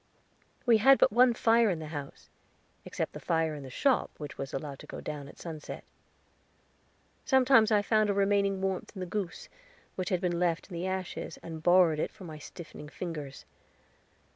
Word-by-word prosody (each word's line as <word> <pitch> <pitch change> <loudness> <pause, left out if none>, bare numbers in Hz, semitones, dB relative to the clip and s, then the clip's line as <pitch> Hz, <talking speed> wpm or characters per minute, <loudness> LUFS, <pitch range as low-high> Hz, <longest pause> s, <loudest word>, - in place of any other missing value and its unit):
We 230 -3 +5
had 270 +5 +7
but - - +4
one 245 +2 +5
fire 230 0 +4
in 180 - 0
the 155 -1 -7
house, 145 -2 -8 0.5
except - - -3
the - - -7
fire 160 -1 0
in 150 - -7
the 135 - -9
shop, 260 - +1
which 150 -2 -7
was 135 -1 -5
allowed 140 0 -5
to - - -12
go - - -7
down 145 -2 -6
at - - -14
sunset. 160 -3 -7 1.4
Sometimes 260 -5 +5
I 205 -1 +4
found 215 -1 +2
a - - +3
remaining 200 -1 +2
warmth 190 -1 -2
in - - -7
the 185 - -3
goose, 185 -1 -4 0.5
which 185 -1 -3
had 185 - +1
been 175 -2 -1
left 175 +1 0
in - - -7
the 175 +2 -3
ashes, 185 -1 -4
and 160 -1 -7
borrowed 175 -2 +5
it - - 0
for 205 - -14
my 155 -3 -8
stiffened 150 -1 -10
fingers. 150 -6 -6
180 Hz, 190 wpm, -30 LUFS, 155-205 Hz, 1.4 s, had